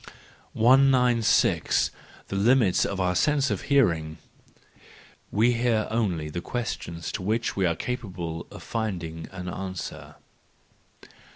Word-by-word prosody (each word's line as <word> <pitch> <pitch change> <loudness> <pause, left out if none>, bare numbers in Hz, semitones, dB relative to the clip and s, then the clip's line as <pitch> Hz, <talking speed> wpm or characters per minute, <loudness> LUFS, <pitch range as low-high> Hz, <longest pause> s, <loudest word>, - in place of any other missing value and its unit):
196. 125 -1 +3 0.4
The - - -3
Limits 110 -1 +3
of 100 - -3
our 90 -1 +1
Sense 140 +4 +2
of 100 - -2
Hearing, 85 - +2 1.1
—We 115 +4 +3
hear 115 -2 +1
only 95 -9 -1
the 85 - -4
questions 85 -7 -4
to - - -4
which 110 +5 -1
we 95 -2 +2
are 85 - 0
capable 90 -8 -5
of - - -11
finding 85 -8 -4
an 90 -1 -7
answer. 95 0 -6
100 Hz, 115 wpm, -26 LUFS, 90-120 Hz, 1.1 s, 196